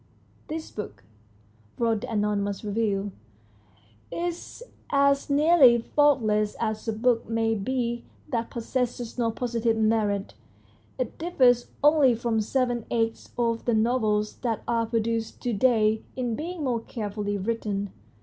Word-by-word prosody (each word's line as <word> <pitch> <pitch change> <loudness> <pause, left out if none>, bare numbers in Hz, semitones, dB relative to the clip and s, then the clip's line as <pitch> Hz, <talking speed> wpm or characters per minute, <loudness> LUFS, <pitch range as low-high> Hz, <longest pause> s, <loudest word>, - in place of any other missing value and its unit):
" - - -33
This 315 +1 -5
book," 110 - -7 0.7
wrote 225 -3 +1
the 250 - -6
anonymous 205 -2 -1
reviewer, 205 -1 -1 0.6
" 105 +2 -31 0.2
is 345 +6 -4 0.3
as 280 0 +3
nearly 285 -4 +6
faultless 225 -5 +2
as 220 0 -2
a 225 - 0
book 230 +1 +1
may 225 0 +1
be 235 +2 -2 0.3
that 230 -1 -1
possesses 245 0 -3
no 230 -1 +2
positive 230 -1 -1
merit. 215 -2 +1 0.6
It 255 -3 -4
differs 255 -8 +3 0.2
only 295 -5 +5
from 230 -1 0
seven 245 0 -1
eighths 225 -1 -1
of 230 -1 0
the 235 - +2
novels 215 -2 +1
that 230 -3 -2
are 230 -1 +1
produced 225 0 -1
to 245 - 0
day 220 -1 +3
in 245 -3 -2
being 330 +5 -4
more 245 -4 0
carefully 205 -2 -3
written. 205 -1 -2
230 Hz, 135 wpm, -26 LUFS, 215-250 Hz, 0.7 s, nearly